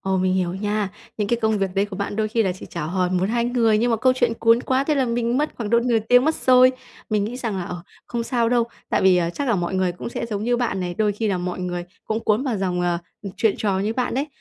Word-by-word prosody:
Ồ, 190 0 0
mình 185 0 +1
hiểu 180 -1 0
nha. 205 +1 -1 0.3
Những 205 -2 -1
cái 235 - +2
công 220 -1 +2
việc 195 -1 -2
đấy 195 +1 +2
của 195 -2 -8
bạn 200 0 -3
đôi 215 -1 0
khi 225 +1 +1
là 185 -3 0
chỉ 185 - -10
chào 170 -3 -5
hỏi 180 +1 0
1,2 195 +6 +1
người, 230 -3 +2
nhưng 240 +1 +1
mà 225 - +2
câu 255 +3 +3
chuyện 245 -2 +1
cuốn 230 +1 +3
quá, 260 +2 0
thế 305 - +1
là 275 -2 +2
mình 235 +1 0
mất 300 +1 -1
khoảng 220 -3 -4
độ 235 - +5
nửa 235 -2 +2
tiếng 245 +2 +6
mất 315 0 +2
rồi. 255 0 +5 0.4
Mình 210 -1 +1
nghĩ 240 +4 -4
rằng 230 -6 -3
là, 175 - -3
ờ, 175 -1 -6 0.2
không 235 -1 -3
sao 235 -1 0
đâu, 240 -1 +3 0.2
tại - - +1
vì, 190 -1 +5
à, 170 -1 +1
chắc 280 +6 -3
là 235 - +3
mọi 175 +1 -2
người 185 -1 +1
cũng 180 - -7
sẽ 235 - -4
giống 210 -2 -3
như 245 +1 +2
bạn 230 -6 -1
này, 175 -1 -3
đôi 210 0 +1
khi 215 +1 -2
là 190 - 0
mọi 180 0 -4
người 175 -1 -3 0.2
cũng 220 +1 -2
cuốn 215 +4 +1
vào 250 -6 -1
dòng, 180 -2 -1
ờ, 175 -1 0 0.4
chuyện 215 0 +2
trò 200 -3 0
như 210 +3 -1
bạn 250 0 -1
đấy. 280 +3 0
215 Hz, 295 wpm, -22 LUFS, 190-240 Hz, 0.4 s, tiếng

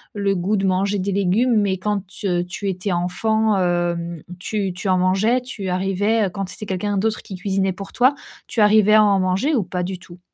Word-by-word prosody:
le 200 -1 0
goût 195 +4 0
de 195 - 0
manger 195 +2 +1
des 195 +1 -2
légumes, 200 +6 +2
mais 190 -2 0
quand 205 0 -2
t 180 -3 -2
tu 195 +3 -5
étais 190 +1 -2
enfant, 215 +5 +1
hem, 175 -2 -1 0.2
tu 195 -1 -2
tu 190 +2 -4
en 185 - +3
mangeais? 195 +7 +2
Tu 205 -6 -6
arrivais, 195 +4 +1
heu, 190 - -1
quand 195 0 -4
c'était 210 - -7
quelqu'un 200 +2 -2
d'autre 215 +2 0
qui 190 - -9
cuisinait 190 0 -1
pour 195 +1 -9
toi, 260 +3 +3 0.3
tu 230 - -4
arrivais 210 0 +5
à 215 - +7
en 200 -2 +3
manger 185 +12 +1
ou 235 - +2
pas 180 0 -3
du 185 0 -4
tout? 175 0 -14
195 Hz, 215 wpm, -21 LUFS, 185-210 Hz, 0.3 s, à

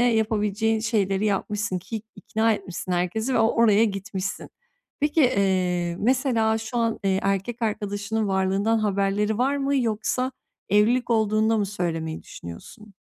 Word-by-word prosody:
yapabileceğin 220 -2 +1
şeyleri 210 -2 0
yapmışsın 205 -1 -1
ki 215 +4 -6
ikna 225 +1 +1
etmişsin 185 -3 -5
herkesi 220 +8 -1
ve - - +3
o 225 0 +4
oraya 225 -1 +4
gitmişsin. 195 -2 -4 0.5
Peki, 295 +2 +2
eee, 185 - +1
mesela, 235 -3 +2
şu 225 +2 -6
an, 230 -1 0
eee, 190 -1 +2
erkek 195 +5 -1
arkadaşının 210 0 -2
varlığından 195 +4 +1
haberleri 205 +1 0
var 275 +3 +2
mı, 280 0 0
yoksa 250 +2 0 0.4
evlilik 230 +5 +3
olduğunda 220 0 +2
mı 205 - 0
söylemeyi 165 -5 -3
düşünüyorsun? 200 - -11
215 Hz, 135 wpm, -24 LUFS, 195-225 Hz, 0.5 s, o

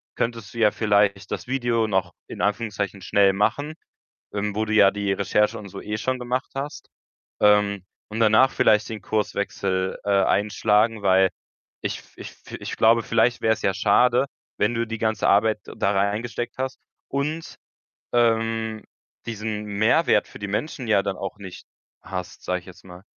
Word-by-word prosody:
könntest 115 -3 -3
du - - -10
ja 105 -2 +5
vielleicht 100 -2 +1
das - - -4
Video 120 -3 0
noch 95 -4 0
in - - -7
Anführungszeichen 105 -2 -2
schnell 100 0 +3
machen, 120 +10 0 0.6
ähm, 100 0 -2
wo 110 +1 0
du 110 - -2
ja 100 -2 +6
die 100 -1 -1
Recherche 105 +3 +1
und 100 -1 -10
so - - -8
eh 105 0 -4
schon 130 +4 -2
gemacht 125 +2 -3
hast, 140 +2 -6 0.5
ähm, 105 -2 +3 0.2
und 110 +1 -5
danach 115 +4 +5
vielleicht 105 0 +3
den 110 -1 -5
Kurswechsel, 100 -2 -1
äh, 100 - -1
einschlagen. 105 +2 +2
Weil 95 -1 +4 0.5
ich - - -2
f - - -23
ich - - -9
fi - - -11
ich - - -5
glaube, 115 +1 +4
vielleicht 115 +2 +2
wäre 110 - +4
es - - -12
ja 95 - +1
schade, 120 +6 +3 0.3
wenn 105 +3 +1
du 115 0 -1
die 115 0 -5
ganze 110 -2 0
Arbeit 105 +1 +3
da 100 - -1
reingesteckt 105 +5 -1
hast 130 0 -3 0.3
und, 150 +4 -3 0.6
ähm, 115 -2 +1 0.4
diesen 110 -1 -4
Mehrwert 105 +4 +2
für - - -12
die 105 - -4
Menschen 125 +5 -3
ja 105 -3 +4
dann 100 - -2
auch 95 +1 -5
nicht 95 -3 -10 0.4
hast, 90 -2 -6
sage 90 0 -1
ich - - -22
jetzt 90 0 -14
mal. 90 0 -12
105 Hz, 175 wpm, -24 LUFS, 100-115 Hz, 0.6 s, ja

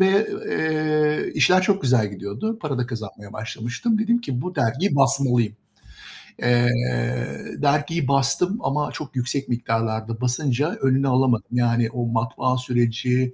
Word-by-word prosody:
ve, 195 +3 +4 0.2
eee, 155 -1 +1
işler 185 +1 +4
çok 195 +1 +1
güzel 120 -5 +2
gidiyordu. 105 - -4
Para 145 -5 -2
da 125 - -1
kazanmaya 110 -4 -8
başlamıştım. 120 - -2
Dedim 230 +2 +2
ki: 130 - -3
"Bu 180 - -5
dergiyi 140 - +1
basmalıyım." 125 -5 +2 0.9
Eee, 120 0 +3 0.9
dergiyi 145 +1 +1
bastım 140 - +1
ama 150 -3 -1
çok 145 -3 -8
yüksek 130 +2 -2
miktarlarda 115 -1 -2
basınca 130 +3 0
önünü 135 +1 +2
alamadım; 125 -3 +2
yani, 120 -1 +2
o 120 +1 -3
matbaa 120 +2 0
süreci, 125 +1 0
130 Hz, 130 wpm, -23 LUFS, 120-150 Hz, 0.9 s, ve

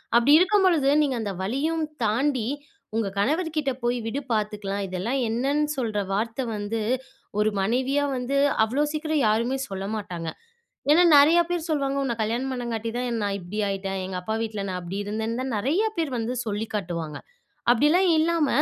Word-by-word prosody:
அப்பிடி 240 +5 +6
இருக்கும்பொழுது, 365 -7 +4
நீங்க 280 -3 +1
அந்த 205 -3 -3
வலியும் 305 +10 0 0.2
தாண்டி 240 +2 +1 0.5
உங்க 225 -2 +1
கணவர்கிட்டே 305 - 0
"போய் 240 +1 +1
விடு 270 +5 -2
பார்த்துக்கலாம்." 210 -2 -2
இதெல்லாம் 190 +9 -2
என்னன்னு 275 +6 +1
சொல்ற 220 -5 -1
வார்த்த 225 +5 -1
வந்து 210 +2 -3 0.6
ஒரு 210 +1 +3
மனைவியா 260 +7 +1
வந்து 250 +2 -2 0.3
அவ்ளோ 245 +6 0
சீக்கிரம் 310 -2 0
யாருமே 230 +5 +1
சொல்ல 195 0 -4
மாட்டாங்க. 175 -6 -4 0.6
ஏன்னா 340 +4 +6
நெறையா 315 +5 +7
பேர் 345 -2 -2
சொல்லுவாங்க, 275 -3 0
உன்ன 245 -3 -1
கல்யாணம் 235 +5 -1
பண்ணங்காட்டி 230 -2 -3
தான் 240 -2 -1
நான் 200 -1 0
இப்பிடி 185 +4 -6
ஆயிட்டேன். 195 0 -3
எங்க 185 0 -4
அப்பா 220 +5 -3
வீட்ல 215 -3 -4
நான் 180 -1 -3
அப்பிடி 180 +3 -5
இருந்தேன்னு, 220 +3 -2
தான் 260 -1 -3
நெறையா 320 - +1
பேரு 320 -5 -1
வந்து 230 +2 -2
சொல்லி 210 0 -2
காட்டுவாங்க. 170 -6 -3 0.5
அப்பிடிலாம் 300 +10 +4
இல்லாம, 325 -1 +2
235 Hz, 160 wpm, -25 LUFS, 210-285 Hz, 0.6 s, நெறையா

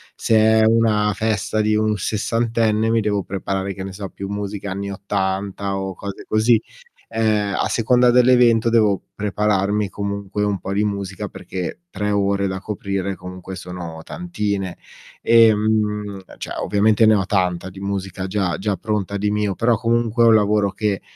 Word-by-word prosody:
Se 115 - +1
è 110 0 +5
una 110 -2 +3
festa 110 0 -1
di 110 0 +2
un 110 0 +1
sessantenne, 110 +1 0
mi 115 -1 +2
devo 105 -2 0
preparare, 95 0 -3
che 95 - -7
ne 95 - -6
so, 100 +1 -6
più 100 0 -7
musica 100 -1 -4
anni 100 +1 -4
80 100 0 -2
o 95 0 -3
cose 100 +2 -7
così. 110 +1 +3 0.6
Ehm, 105 -3 +1
a - - 0
seconda 125 +2 +3
dell'evento 120 -2 +5
devo 105 -4 +3
prepararmi 105 0 0
comunque 100 0 -3
un 100 -2 0
po' 95 - -4
di 105 +1 +1
musica, 100 -2 -3
perché 90 - -6
3 105 0 -2
ore 100 -1 +1
da 95 0 -3
coprire 100 -1 -3
comunque 90 +1 -8
sono 90 -3 -7
tantine. 100 - -3 0.4
Ehm, 105 -3 +3 0.2
cioè - - -5
ovviamente 105 +2 +3
ne 110 - +6
ho 100 -2 +1
tanta 90 -2 0
di 95 - -12
musica 95 -1 -4
già 95 -2 -1
già 100 0 -1
pronta 105 -2 -2
di 105 +1 0
mio, 105 -1 0
però, 115 +2 +2
comunque 115 0 +1
è 115 - +6
un 115 - +7
lavoro 105 -1 +2
che 105 -1 -1
105 Hz, 165 wpm, -21 LUFS, 95-110 Hz, 0.6 s, un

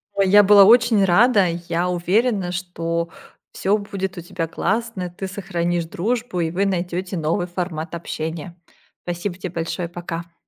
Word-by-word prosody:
Ой, 195 -1 +2
я 205 +2 +8
была 200 0 +8
очень 230 0 +5
рада. 200 +1 +4 0.2
Я 175 +2 0
уверена, 185 +2 +1
что 170 -2 -3 0.4
всё 200 +2 +1
будет 195 -2 -5
у 175 - -4
тебя 165 -1 -4
классно, 225 +3 -2
и 180 - -4
ты 190 +2 -6
сохранишь 175 -3 -2
дружбу, 215 +3 -2
и 160 -1 -1
вы 190 +4 0
найдёее 180 0 -2
новый 165 +2 -1
формат 175 -2 -4
общения. 165 +1 -5 0.5
Спасибо 175 +1 -3
те 185 -1 -5
большое. 170 +1 -3
Пока. 170 -1 -6
180 Hz, 155 wpm, -21 LUFS, 170-200 Hz, 0.5 s, я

